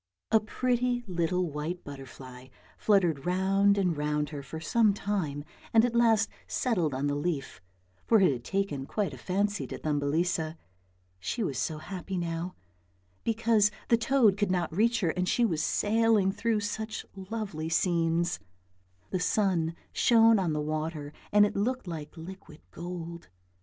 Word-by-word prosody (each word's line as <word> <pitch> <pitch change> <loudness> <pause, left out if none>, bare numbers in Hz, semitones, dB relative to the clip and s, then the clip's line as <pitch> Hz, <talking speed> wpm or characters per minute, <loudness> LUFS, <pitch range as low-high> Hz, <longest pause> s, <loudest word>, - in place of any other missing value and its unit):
A 220 - +6
pretty 245 +2 0
little 180 -1 0
white 155 +5 -4
butterfly 130 -2 -10 0.3
fluttered 175 -9 +2
round 195 +2 +3
and 180 -4 +1
round 150 0 -1
her 145 -2 -6
for 160 +3 -7
some 210 +5 +3
time 180 -9 -2 0.3
and 225 +1 +7
at 245 - -1
last 225 -3 +4 0.2
settled 175 - 0
on 135 +2 -1
the 145 - +1
leaf, 145 - -3 0.5
for 225 - +6
it 190 -6 +5
had 120 -2 -6
taken 150 -6 -2
quite 205 -3 -1
a - - -8
fancy 200 +2 -1
to - - -6
Thumbelisa: 155 +2 0 0.6
she 220 - -2
was 140 - -2
so 155 - -2
happy 185 +3 -5
now, 170 +1 -3 0.7
because 225 -2 +3 0.2
the 235 - +6
toad 230 -3 +3
could 205 -2 +1
not 175 -3 -1
reach 230 +4 +2
her 170 -4 +2
and 180 +1 -1
she 240 - +3
was 160 -8 0
sailing 215 -1 +3
through 215 +2 0
such 215 +1 -4
lovely 195 -5 -4
scenes; 170 0 +1 0.7
the 185 - 0
sun 180 -4 +1 0.2
shone 225 -2 +5
on 180 -4 0
the 150 - -1
water 155 -1 -3 0.2
and 205 0 +6
it 205 - -3
looked 250 +5 -1
like 160 -3 -7
liquid 165 -2 -10
gold. 170 -1 -7
180 Hz, 155 wpm, -29 LUFS, 160-210 Hz, 0.7 s, and